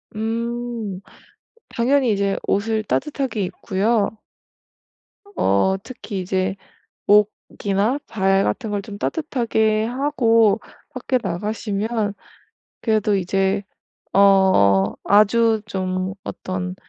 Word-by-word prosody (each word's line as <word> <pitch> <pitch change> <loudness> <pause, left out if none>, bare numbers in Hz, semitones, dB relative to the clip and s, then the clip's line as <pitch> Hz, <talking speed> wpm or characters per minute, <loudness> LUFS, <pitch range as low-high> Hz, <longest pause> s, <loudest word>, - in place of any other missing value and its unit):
음 230 -2 -3 0.7
당연히 255 +1 +2
이제 200 -1 0
옷을 215 +2 0
따뜻하게 265 -1 -2
입고요. 200 +4 0 1.2
어 100 - +2
특히 205 -5 -7
이제 185 +1 -1 0.5
목이나 210 +2 +1
발 195 -2 +2
같은 225 -5 -2
걸 205 -1 -2
좀 205 0 -9
따뜻하게 220 -7 0
하고 230 -4 +2 0.3
밖에 255 0 -1
나가시면 210 +3 -2 0.7
그래도 215 -2 +1
이제 195 +2 0 0.5
어 190 - +4
아주 220 +2 +4
좀 185 -1 -2
어떤 185 -1 -5
210 Hz, 180 characters per minute, -21 LUFS, 195-230 Hz, 1.2 s, 어